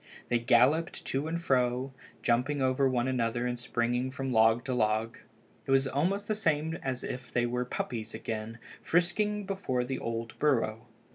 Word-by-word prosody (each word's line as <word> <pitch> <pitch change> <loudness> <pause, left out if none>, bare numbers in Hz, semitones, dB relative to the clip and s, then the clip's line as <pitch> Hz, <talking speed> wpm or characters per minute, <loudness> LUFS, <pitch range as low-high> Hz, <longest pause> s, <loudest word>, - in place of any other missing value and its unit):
They 120 - +2
galloped 130 +9 +3
to 135 +3 -1
and 165 +1 -2
fro, 130 -3 +1 0.3
jumping 125 +5 +1
over 130 +1 +2
one 125 -1 +1
another 120 -2 0
and 125 0 -2
springing 120 +1 0
from 130 0 -3
log 115 +1 +4
to 130 - -1
log. 110 -1 0 0.5
It - - -8
was 135 0 +4
almost 185 +10 0
the 215 - +1
same 160 -6 0
as 130 -2 -3
if 125 -1 -6
they 120 -1 +1
were 125 +1 -1
puppies 115 -3 -4
again, 110 +1 -5 0.2
frisking 205 +4 +1
before 190 -11 -1
the 130 +1 -3
old 115 0 -4
burrow. 120 -5 +1
125 Hz, 165 wpm, -30 LUFS, 120-145 Hz, 0.5 s, log